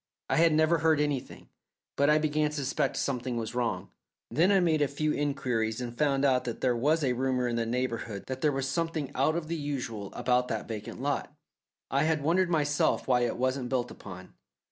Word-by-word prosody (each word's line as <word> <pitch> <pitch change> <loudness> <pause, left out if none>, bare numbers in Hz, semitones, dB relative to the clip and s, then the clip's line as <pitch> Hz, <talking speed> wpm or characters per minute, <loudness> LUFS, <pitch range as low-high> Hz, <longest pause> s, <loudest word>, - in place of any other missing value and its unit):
I - - +3
had 165 0 +5
never 155 +2 +3
heard 160 -1 +3
anything, 145 -3 -3 0.5
but 140 +1 +3
I 150 - +5
began 155 0 +1
to 150 - -7
suspect 140 -2 -1
something 125 -2 -2
was 115 0 -3
wrong. 115 -7 -2 0.4
Then 165 - +3
I 195 - +5
made 160 -4 +2
a 145 - +4
few 150 +2 -1
inquiries 125 -6 -1
and 120 -1 -5
found 140 0 +2
out 130 -2 +3
that 120 - -4
there 125 -2 +2
was 150 +6 +2
a 130 -2 +2
rumour 125 0 0
in 120 - -1
the 115 -1 -1
neighbourhood 115 -4 -2
that 130 0 -5
there 150 - +3
was 135 -1 -2
something 155 -1 -2
out 140 +4 +2
of 170 -2 -2
the 170 - -2
usual 125 -9 -4
about 125 0 +1
that 110 -3 -3
vacant 115 +2 -6
lot. 145 0 -1 0.6
I 140 +3 +2
had 160 -2 +1
wondered 175 +4 +2
myself 145 -3 +1
why 125 -2 +4
it 120 -1 0
wasn't 130 0 -1
built 125 -2 -1
upon. 95 -2 -10
135 Hz, 210 wpm, -29 LUFS, 120-150 Hz, 0.6 s, had